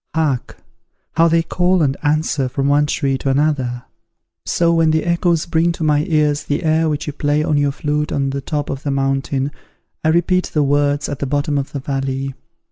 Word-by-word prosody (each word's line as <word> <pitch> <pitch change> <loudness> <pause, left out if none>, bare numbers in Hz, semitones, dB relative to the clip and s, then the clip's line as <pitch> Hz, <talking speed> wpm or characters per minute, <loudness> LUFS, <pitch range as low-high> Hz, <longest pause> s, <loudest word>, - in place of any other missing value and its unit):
Hark! 150 -6 -1 0.5
how 165 0 +4
they 165 0 +3
call 180 +1 +1
and 135 -2 +1
answer 150 -3 0
from 135 +1 -1
one 145 +1 +3
tree 135 -3 0
to 135 - -2
another. 135 -4 0 0.6
So 170 -1 +2
when 165 -1 +3
the 155 0 +1
echoes 170 -1 +1
bring 170 0 +1
to 165 - -5
my 150 0 +2
ears 150 -2 +1
the 145 - -1
air 160 0 +2
which 150 -1 -2
you 150 - -4
play 145 +1 0
on 155 - +1
your 145 -1 +2
flute 150 +1 -2
on 135 -1 0
the 140 0 -3
top 145 +1 -3
of 135 - -5
the 145 - -3
mountain, 135 0 -1 0.5
I - - +1
repeat 175 +3 +2
the 150 - +3
words 145 +1 +1
at 145 - -5
the 140 - -2
bottom 145 +2 0
of 135 - -5
the 140 - -4
valley. 135 0 -3
145 Hz, 205 wpm, -18 LUFS, 140-160 Hz, 0.6 s, how